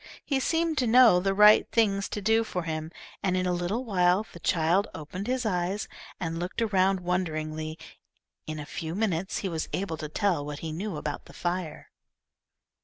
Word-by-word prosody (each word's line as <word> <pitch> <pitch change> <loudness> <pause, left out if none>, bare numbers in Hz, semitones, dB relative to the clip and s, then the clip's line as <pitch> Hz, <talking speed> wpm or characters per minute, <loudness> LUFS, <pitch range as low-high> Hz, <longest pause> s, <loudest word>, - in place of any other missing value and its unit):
He 275 -2 +1
seemed 325 +2 +1
to 250 - +1
know 235 -5 +7
the 195 +1 0
right 210 +1 +7
things 200 -4 +2
to 210 - -4
do 225 +2 +3
for 180 -5 -4
him, 160 0 -4 0.3
and 185 -1 +1
in 185 - 0
a 180 - +1
little 180 +8 -2
while 185 -1 +2
the 170 - -10
child 170 +5 +2
opened 170 +6 -6
his 255 -1 -1
eyes 185 0 -1 0.3
and 165 -1 -3
looked 175 +5 -4
around 195 -4 +2
wonderingly. 155 -3 -2 0.7
In 155 0 -4
a 150 - -6
few 160 +2 -5
minutes 190 -3 -1
he - - +1
was 165 -3 -3
able 185 -4 -2
to 150 -1 -6
tell 175 -2 0
what 145 0 -6
he 160 - -3
knew 180 +2 -4
about 150 -1 -5
the - - -14
fire. 175 -3 -4
180 Hz, 185 wpm, -27 LUFS, 160-210 Hz, 0.7 s, know